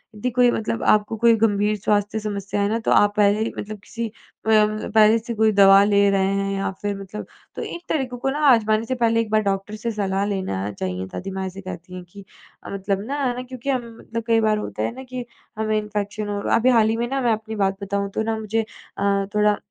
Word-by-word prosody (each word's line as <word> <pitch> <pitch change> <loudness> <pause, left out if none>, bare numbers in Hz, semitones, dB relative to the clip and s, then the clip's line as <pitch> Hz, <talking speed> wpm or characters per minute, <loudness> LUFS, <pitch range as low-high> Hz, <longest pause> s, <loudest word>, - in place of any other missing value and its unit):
यदि 215 +4 -2
कोई 245 -1 +5
मतलब 225 0 -2
आपको 210 +1 +2
कोई 235 -1 +7
गंभीर 210 -1 +2
स्वास्थ्य 205 +1 0
समस्या 205 -1 -3
है 200 - +1
ना 225 - +1
तो 225 - -1
आप 205 0 +5
पहले 205 0 +4
ही 220 - -1
मतलब 215 0 -6
किसी 230 0 -4
अ, 220 0 -11
म 215 0 +2
पहले 215 +1 +6
से 235 +1 -5
कोई 220 0 +3
दवा 195 0 +7
ले 200 -1 +4
रहे 195 -1 +2
हैं 195 0 -1
या 195 - -1
फिर 205 -1 -2
मतलब 200 +2 -7 0.3
तो - - -5
एक 345 - -6
तरीकों 260 -5 -1
को 270 - -1
ना 290 - -3
आज़माने 220 -2 +3
से 260 - -2
पहले 230 -2 +2
एक 225 - -5
बार 215 0 +4
डॉक्टर 195 +1 -2
से 230 +2 -3
सलाह 200 -2 -1
लेना 190 - -2
चाहिए। 95 -2 -4
दादी 195 - -6
माँ 190 0 -3
ऐसे 190 +1 -8
कहती 180 -1 -9
हैं 180 - -7
कि 200 +2 -12 0.5
मतलब 195 0 -2
ना 280 - -2
है 245 -1 0
ना, 250 - -4
क्योंकि 255 +1 -7
हम 235 -3 -4
मतलब 230 0 -5
कई 225 -1 +4
बार 215 -1 +2
होता 210 - -4
है - - -1
ना 260 - -8
कि 250 -1 -4 0.3
हमें 215 0 +1
इन्फेक्शन 210 0 -4
हो 205 0 -2
र - - -1
अभी 240 +3 +3
हाल 225 -3 +4
ही 225 - 0
में 240 +1 -1
ना 270 0 -1
मैं 240 -2 +3
अपनी 220 0 -5
बात 195 -2 0
बताऊँ 200 0 -2
तो 220 - 0
ना 220 0 -1
मुझे, 220 +1 -1 0.4
अ, 200 0 +1
थोड़ा 210 0 +3
210 Hz, 245 wpm, -22 LUFS, 200-225 Hz, 0.5 s, कोई